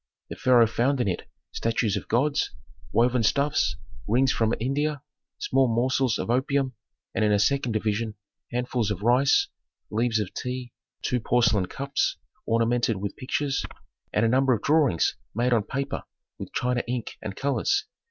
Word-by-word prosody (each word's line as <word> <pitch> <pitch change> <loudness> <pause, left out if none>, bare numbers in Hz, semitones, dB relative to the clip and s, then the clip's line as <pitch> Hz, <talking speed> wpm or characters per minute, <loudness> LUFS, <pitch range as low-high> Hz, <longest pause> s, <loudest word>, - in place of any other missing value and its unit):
The - - -4
pharaoh 125 -2 +5
found 125 +5 +1
in 125 - +1
it 90 - -3 0.2
statues 115 -2 0
of 100 - -4
gods, 140 +6 +1 0.4
woven 120 +1 +3
stuffs, 140 +6 +2 0.3
rings 125 +5 +3
from 110 -1 +1
India, 140 +4 -1 0.3
small 135 0 +2
morsels 125 +1 +1
of - - -2
opium, 135 +1 +1 0.4
and - - +1
in 105 - +3
a 105 - +4
second 125 +3 +1
division 110 0 -1 0.4
handfuls 125 -2 -1
of 105 -1 -3
rice, 125 +4 +4 0.4
leaves 115 +1 +1
of 105 -4 -3
tea, 125 -1 -5 0.3
two 125 - +1
porcelain 115 -4 +2
cups 140 +5 -1 0.3
ornamented 115 -1 +2
with 100 +1 -4
pictures, 135 +1 -1 0.5
and 110 - +2
a - - +4
number 130 +2 +3
of 110 - -7
drawings 145 - +3 0.2
made 120 +2 +2
on 115 - +4
paper 135 +6 -3 0.4
with - - -7
China 125 0 0
ink 120 -2 -4
and 105 -3 -5
colors. 390 - 0
125 Hz, 155 wpm, -26 LUFS, 115-135 Hz, 0.5 s, pharaoh